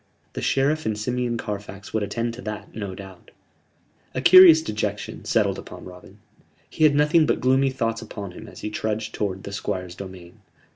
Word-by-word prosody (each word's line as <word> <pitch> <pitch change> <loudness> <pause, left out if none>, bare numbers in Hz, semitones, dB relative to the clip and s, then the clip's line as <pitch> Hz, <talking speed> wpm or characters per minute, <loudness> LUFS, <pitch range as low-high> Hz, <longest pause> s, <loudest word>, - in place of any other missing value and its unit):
The - - -5
Sheriff 145 +2 +1
and 110 -1 -1
Simeon 120 +2 -2
Carfax 100 -2 -7
would 110 - 0
attend 115 +3 -2
to 125 - -9
that, 105 -2 -7
no 100 -4 -5
doubt. 95 -2 -12 0.9
A - - 0
curious 170 0 +9
dejection 110 -7 -4
settled - - +1
upon - - -10
Robin. 90 +2 -13 0.5
He 155 - +2
had 145 -2 +4
nothing 150 +2 +4
but - - +1
gloomy 130 +2 +3
thoughts 115 -3 -2
upon 105 -3 -7
him 90 - -11
as - - -12
he 105 - -4
trudged 110 0 -3
towards 95 -2 -3
the 100 - -7
Squire's 95 -3 -4
domain. 90 -2 -11
110 Hz, 180 wpm, -24 LUFS, 100-130 Hz, 0.9 s, curious